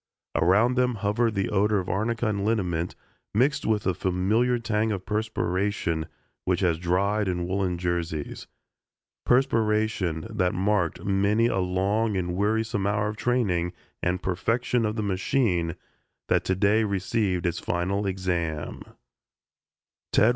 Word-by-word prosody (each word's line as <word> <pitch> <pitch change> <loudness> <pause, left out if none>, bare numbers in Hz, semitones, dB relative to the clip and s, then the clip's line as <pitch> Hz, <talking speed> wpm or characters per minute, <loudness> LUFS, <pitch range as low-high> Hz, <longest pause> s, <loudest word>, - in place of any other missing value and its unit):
Around 105 +9 +3
them 125 -1 +2
hovered 110 +2 0
the 95 -1 0
odor 105 +1 +2
of 95 -2 -2
arnica 110 +5 -1
and 100 -2 0
liniment 90 -6 0 0.4
mixed 135 +6 +2
with 110 -2 +1
the 95 - +1
familiar 100 +8 +1
tang 110 -1 0
of 95 -3 -4
perspiration 100 -5 -1 0.4
which 90 0 0
has 85 -4 +2
dried 100 +4 +1
in 90 -1 -1
woolen 95 -1 0
jerseys 85 -3 -3 0.8
perspiration 110 -9 +2
that 90 -1 0
marked 95 -2 0
many 100 +3 +2
a 105 -5 +1
long 100 +4 +1
and 90 -1 -2
wearisome 105 +1 0
hour 105 +1 +1
of 105 - -5
training 100 -9 0 0.3
and 90 0 -1
perfection 115 +5 0
of 105 - -3
the 110 - -1
machine 95 - 0 0.5
that - - +3
to 95 - +1
day 105 +4 +3
received 100 -2 0
its 85 -1 0
final 95 +4 -1
"exam." 90 -5 -2
100 Hz, 135 wpm, -26 LUFS, 90-110 Hz, 0.8 s, Around